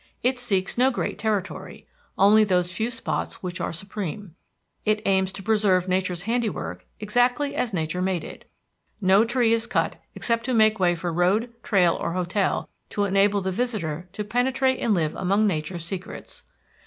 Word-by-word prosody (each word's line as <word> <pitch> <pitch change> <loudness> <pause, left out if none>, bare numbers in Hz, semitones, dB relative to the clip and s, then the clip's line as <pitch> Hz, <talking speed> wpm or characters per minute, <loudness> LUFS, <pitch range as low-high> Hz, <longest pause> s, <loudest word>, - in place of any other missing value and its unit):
It 255 +1 +1
seeks 200 -3 0
no 260 +1 +5
great 240 - -3
territory 210 -3 -3 0.3
only 210 +3 +6
those 180 -3 +1
few 220 +5 -1
spots 230 -4 -4
which 180 -1 -4
are - - -2
supreme. 195 +1 -6 0.5
It 215 0 +2
aims 190 -1 +2
to 195 - -7
preserve 205 -4 +2
nature's 185 -1 -1
handiwork 230 0 -2
exactly 245 +6 +1
as 240 - -1
nature 165 -1 -2
made 185 -3 0
it. - - -11 0.5
No 195 +1 +5
tree 235 -1 +2
is 230 0 +1
cut - - -1
except 230 -1 0
to 255 -1 0
make 220 -1 +4
way 175 -1 +3
for 170 0 -3
road, 195 +8 +2
trail 180 -6 +3
or 170 - -3
hotel 185 +2 0 0.2
to 205 - -1
enable 200 +1 +3
the 190 0 -2
visitor 185 -7 -3
to 210 - -3
penetrate 260 +4 +1
and 220 -3 +2
live 160 -3 0
among 200 +3 +1
nature's 170 -2 -2
secrets. 185 +1 -7
200 Hz, 165 wpm, -25 LUFS, 180-225 Hz, 0.5 s, only